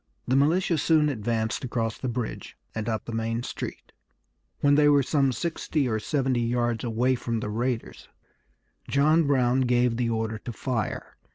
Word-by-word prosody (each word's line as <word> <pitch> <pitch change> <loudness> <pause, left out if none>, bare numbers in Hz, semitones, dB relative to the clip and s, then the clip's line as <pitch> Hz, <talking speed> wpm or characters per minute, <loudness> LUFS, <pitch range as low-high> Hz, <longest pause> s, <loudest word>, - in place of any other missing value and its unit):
The 130 - +2
militia 160 +4 +2
soon 155 -1 +3
advanced 110 -2 -2
across 115 -3 -2
the 130 - -2
bridge 120 -1 -5 0.2
and 110 +1 -3
up 110 -1 -2
the - - -6
main 115 +1 -2
street. - - -6 0.7
When 145 0 +4
they 145 0 +5
were 145 -1 +5
some 140 -1 +2
sixty 150 +1 -1
or 110 -2 0
seventy 130 0 0
yards 120 -1 0
away 120 +2 +1
from 120 -2 -2
the 105 - -4
raiders 120 +2 -3 0.8
John 155 +3 +3
Brown 130 -2 +3
gave 125 -2 +2
the 120 -1 0
order 110 -1 -2
to 120 - -6
fire. 115 -1 -3
125 Hz, 165 wpm, -26 LUFS, 115-140 Hz, 0.8 s, they